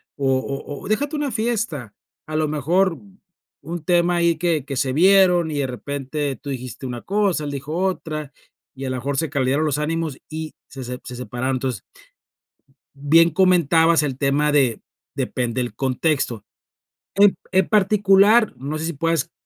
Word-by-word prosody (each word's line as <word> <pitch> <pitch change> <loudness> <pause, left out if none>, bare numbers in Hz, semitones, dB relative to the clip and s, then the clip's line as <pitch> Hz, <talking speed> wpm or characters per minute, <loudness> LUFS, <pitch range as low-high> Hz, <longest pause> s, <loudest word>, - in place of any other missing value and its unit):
o 135 -2 +1
o 140 +1 -6
o - - -7
déjate 285 +8 -1
una 290 -3 -2
fiesta, 215 - -2 0.3
a 155 - -5
lo 155 0 +1
mejor 165 +5 +1 0.6
un 165 +2 -6
tema 175 0 +2
ahí, 170 -1 +3
que 160 -5 0
que 140 - -5
se 130 0 0
vieron 180 0 +5
y 145 - -2
de 135 - 0
repente 140 +2 -4
tú 145 - -10
dijiste 130 0 -6
una 120 -2 -5
cosa, 195 -6 0
él 145 - -4
dijo 140 +3 -5
otra, 160 -5 -2 0.4
y 135 0 -6
a - - -2
la 130 - -2
mejor 135 +2 -3
se 160 -1 0
caldearon 140 +1 +1
los 145 -2 0
ánimos 160 -2 -2
y 160 0 -6
se 135 - -9
se 125 +1 -6
se 125 - -8
separaron. 125 +2 -3
Entonces, 125 -3 -3 1.1
bien 160 +4 +4
comentabas 170 -2 +4
el 135 -3 -3
tema 145 +1 +1
de 135 -6 +2 0.4
depende 125 0 -2
el 120 -4 -3
contexto. 130 -2 -1 0.7
En 200 0 +5 0.2
en 190 0 +3
particular, 205 +1 +4
no 145 +4 -4
sé 160 - -3
si 170 - -2
puedas, 165 +1 -1
155 Hz, 170 wpm, -21 LUFS, 135-175 Hz, 1.1 s, vieron